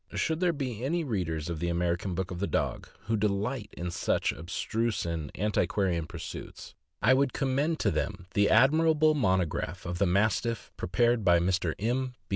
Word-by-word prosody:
Should 160 0 0
there 180 -1 +3
be 130 -7 -4
any 165 +5 0
readers 85 - -2
of 85 -2 -4
THE 85 +1 -1
AMERICAN 85 +2 -1
BOOK 95 +1 -3
OF 90 - -5
THE 100 - -1
DOG - - -2
who 110 - -1
delight 105 +3 -1
in 90 0 -3
such - - 0
abstruse 105 +8 -2
and 80 -4 -3
anti 105 +2 +1
quarian 90 -5 0
pursuits, - - -8 0.3
I 120 +4 +6
would 135 0 +2
commend 140 +4 0
to - - +2
them 95 -2 -3
the 100 0 +3
admirable 155 +5 +5
monograph 95 - 0
of 90 0 -4
the 100 - +3
Mastiff 110 +5 0
prepared 120 +5 +1
by 85 -2 +5
Mr. 90 -1 0
M. 125 +4 -1
100 Hz, 175 wpm, -29 LUFS, 90-130 Hz, 0.3 s, I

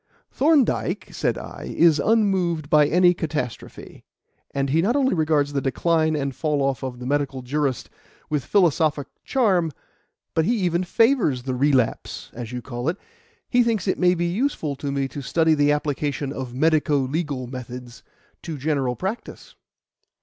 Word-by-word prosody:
"Thorndyke," 290 -2 +1
said - - -1
I, - - -8
"is 160 -3 +5
unmoved 185 -8 +1
by 150 -1 +6
any 180 +2 +4
catastrophe; 145 -9 -5 0.5
and 140 -1 -2
he 160 +3 +3
not 220 +8 +1
only 270 -2 +2
regards 155 -4 +1
the 140 - 0
'Decline 155 +4 +1
and 140 -3 -2
Fall 150 -3 0
off 135 -1 -1
of 130 -2 -5
the 125 - -8
Medical 140 -1 -1
Jurist' 135 -1 -1 0.4
with 150 -3 -1
philosophic 155 -4 +2 0.3
calm, 190 -11 +2 0.6
but 160 - +2
he 235 +5 +1
even 175 -2 0
favours 190 - +2
the 130 0 -2
relapse, 130 -2 0
as 120 -1 -7
you 125 -1 -5
call 120 +2 -3
it. 180 - -2 0.5
He 245 - +3
thinks 225 -5 0
it 185 - 0
may 180 0 +4
be 175 0 -1
useful 175 - -1
to 140 0 -4
me 140 -1 -1
to 145 - -7
study 160 +4 +2
the 145 -1 +3
application 145 -1 -2
of 130 -3 -5
medico 150 +2 +2
legal 140 -1 -2
methods 125 -1 -8 0.4
to 160 -3 -6
general 135 -3 -1
practice." 195 - -6
150 Hz, 160 wpm, -23 LUFS, 135-175 Hz, 0.6 s, by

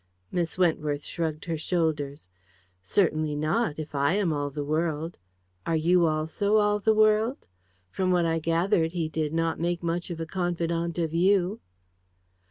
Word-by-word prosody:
Miss 170 -1 -2
Wentworth 150 -5 +1
shrugged 160 -2 -3
her 165 -3 -3
shoulders. 155 - -1 0.5
"Certainly 155 - +1
not 155 +4 0
if 155 -1 -6
I 140 +3 +2
am 195 -5 +1
all 145 -1 -2
the 145 +1 -4
world. 160 +2 -2 0.4
Are 165 - 0
you 170 +2 +3
also 160 +7 +1
all 210 0 +3
the 220 +1 +2
world? 215 +4 +3 0.5
From 185 - -1
what 175 -2 +3
I 165 0 +1
gathered 165 0 +1
he 170 -3 -1
did 155 -1 -2
not 165 0 0
make 175 +1 -1
much 170 +1 -2
of 170 -2 -5
a 165 - -3
confidante 170 -1 -2
of 160 -1 -3
you." 190 +4 +2
165 Hz, 160 wpm, -27 LUFS, 155-180 Hz, 0.5 s, you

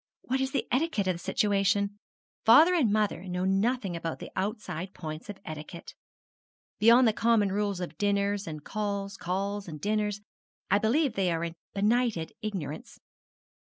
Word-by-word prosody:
What 265 +2 -1
is 265 0 -1
the 275 - -1
etiquette 260 -5 +1
of 185 - +2
the - - -7
situation? 200 +1 +1 0.4
Father 310 +11 +7
and 280 - +3
mother 210 -3 0
know 180 0 -2
nothing 195 0 +1
about 165 -1 -4
outside 190 -3 -4
points 155 +3 -7
of 205 - -6
etiquette. 155 +2 -8 0.9
Beyond 235 +3 +7
the 220 - +3
common 220 -3 +2
rules 200 -1 -1
of 170 -4 -6
dinners 200 0 +1
and 155 -2 -6
calls, 200 -2 -3
calls 195 +2 -3
and 155 -3 -7
dinners, 210 +2 0 0.5
I 200 - +5
believe 255 +5 +2
they 190 -3 +1
are 165 0 -1
in 170 -1 -3 0.2
benighted 210 -4 +1
ignorance. 175 -9 -5
200 Hz, 155 wpm, -29 LUFS, 180-215 Hz, 0.9 s, Father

